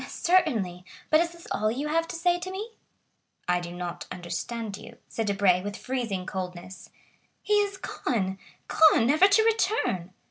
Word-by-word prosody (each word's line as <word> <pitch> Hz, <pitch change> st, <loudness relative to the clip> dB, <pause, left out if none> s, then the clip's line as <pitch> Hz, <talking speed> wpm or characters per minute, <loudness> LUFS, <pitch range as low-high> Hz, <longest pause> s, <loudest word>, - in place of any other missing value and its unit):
"Certainly; 230 Hz, -, +1 dB, 0.3 s
but 310 Hz, -, +6 dB
is 335 Hz, 0 st, +1 dB
this 340 Hz, 0 st, -14 dB
all 215 Hz, +1 st, +1 dB
you 270 Hz, +7 st, -2 dB
have 330 Hz, +1 st, +1 dB
to -, -, -6 dB
say 350 Hz, +1 st, +2 dB
to 365 Hz, +1 st, -5 dB
me?" 410 Hz, +5 st, -6 dB, 0.8 s
"I 180 Hz, 0 st, +2 dB
do 175 Hz, 0 st, -7 dB
not 175 Hz, 0 st, -6 dB
understand 210 Hz, +4 st, -4 dB
you," 230 Hz, +3 st, -12 dB
said 225 Hz, -2 st, -3 dB
Debray 195 Hz, -3 st, +3 dB
with 205 Hz, +1 st, -5 dB
freezing 230 Hz, -8 st, -3 dB
coldness. 185 Hz, -1 st, -6 dB, 0.5 s
"He 420 Hz, -, 0 dB
is 400 Hz, -1 st, -3 dB
gone! 195 Hz, -, -2 dB, 0.3 s
Gone, 315 Hz, -7 st, +5 dB
never 310 Hz, +9 st, +6 dB
to 405 Hz, +2 st, +4 dB
return!" 415 Hz, -, +1 dB
230 Hz, 165 wpm, -27 LUFS, -, 0.8 s, but